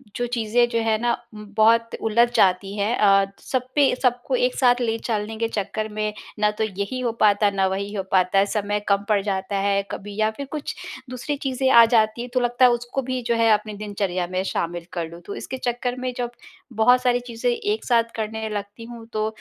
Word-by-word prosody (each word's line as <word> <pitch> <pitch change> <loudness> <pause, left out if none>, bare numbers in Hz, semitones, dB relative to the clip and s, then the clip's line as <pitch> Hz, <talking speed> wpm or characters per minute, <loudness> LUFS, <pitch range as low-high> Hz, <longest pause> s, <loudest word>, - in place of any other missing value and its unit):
जो 245 - -1
चीज़ें 240 +1 +2
जो 230 -1 0
हैं 220 -1 +1
ना 240 +1 +1 0.2
उम्म, 210 0 -9
बहुत 230 +1 +4
उलझ 230 +2 +3
जाती 195 +1 +2
हैं। 210 +4 +1
अ, 195 -1 +5 0.2
सब 255 -1 -2
पे 285 -3 +4
सबको 250 +1 +1
एक 250 0 +1
साथ 245 -1 +3
ले 225 -1 0
चलने 220 0 -2
के 230 - 0
चक्कर 215 0 -3
में 215 0 -2 0.3
ना 210 0 +3
तो - - +2
यही 200 +4 -3
हो 245 -2 0
पाता 210 0 +4
है 200 - +2
ना 190 -1 +2
वही 200 +2 -3
हो 195 -2 -2
पाता 185 0 +3
है 195 - +4
समय 205 0 -1
कम 200 0 +2
पड़ 205 -2 +3
जाता 195 0 -2
है 200 0 +2
कभी 205 0 -7
या 215 0 +3
फिर 280 - -4
कुछ 300 -2 -4 0.3
दूसरी 255 +4 -3
चीज़ें 260 0 +1
आ 235 -2 +9
जाती 225 0 +2
है 245 - -5
तो 255 - +3
लगता 245 +1 +3
है, 245 - +6
उसको 240 +3 -2
भी 255 0 -3
जो 235 -1 0
है 230 0 +3
अपनी 215 0 +1
दिनचर्या 200 -4 -2
में 185 +1 -2
शामिल 170 -2 -3
कर 170 -2 -3
लूँ। 170 +1 -11
तो 200 - -6
इसके 260 - -6
चक्कर 245 0 -2
में 255 0 -2
जब 240 -1 -2 0.4
बहुत 245 +3 +4
सारी 245 -1 +2
चीज़ें 235 +1 -2
एक 415 - -2
साथ 235 -2 +4
करने 220 0 -3
लगती 205 +2 -6
हूँ 235 -1 -10
तो 215 0 0
220 Hz, 225 wpm, -23 LUFS, 200-245 Hz, 0.4 s, आ